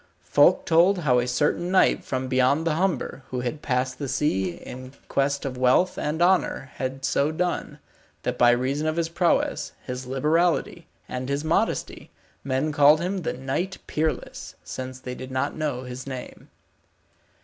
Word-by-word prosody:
Folk - - +4
told 175 +4 +4
how 125 -6 +3
a 120 - -1
certain 150 +7 0
knight 190 0 +3
from 130 -1 -3
beyond 130 +5 +2
the 165 - +2
Humber, 180 -4 -1
who 125 -1 -3
had 135 +5 -4
passed 130 0 -1
the 140 - -3
sea 110 -9 0
in 130 +7 -10
quest 140 +1 0
of 130 -2 -4
wealth 130 +9 +3
and 155 +3 -1
honour, 175 -7 +1
had 130 0 -3
so 145 +2 +1
done, 175 +2 -2 0.5
that - - -1
by 120 - +5
reason 130 +5 +1
of 155 - 0
his 165 -1 0
prowess, 170 +1 0
his 125 0 -5
liberality, 165 +5 +1 0.2
and 130 +1 -4
his 140 +1 -1
modesty, 170 +8 -1 0.3
men 135 +3 0
called 150 +1 +6
him 185 +3 -2
the 170 - -2
Knight 135 +9 -3
Peerless, 155 0 -3
since 130 0 -6
they 125 -1 -6
did 130 +1 -8
not 130 +2 -1
know 145 -5 -2
his 125 +1 -7
name. 130 -2 -8
140 Hz, 165 wpm, -25 LUFS, 130-160 Hz, 0.5 s, called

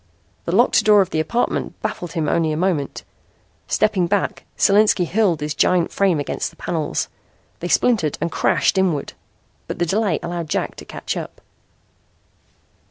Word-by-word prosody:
The - - -2
locked - - +4
door 210 -1 +6
of 190 - -1
the 155 - 0
apartment 235 +10 -1
baffled 175 -2 -4
him 160 -4 -1
only 160 0 +1
a 155 - -2
moment. 165 -5 -1 0.6
Stepping 205 -5 +1
back, 200 +1 -1
Solinski 200 -2 +4
hurled 185 -6 +1
his 150 0 -2
giant 175 +3 +2
frame 190 -6 +2
against 145 - -3
the 165 - -21
panels. 160 -2 -2 0.5
They - - -4
splintered 195 - +2
and 170 +2 -2
crashed 190 - +2
inward. 175 -7 0 0.5
But - - -5
the 175 - +1
delay 195 -2 +1
allowed 170 -2 -4
Jack - - -1
to - - -9
catch - - -5
up. - - -7
175 Hz, 160 wpm, -21 LUFS, 160-200 Hz, 0.6 s, door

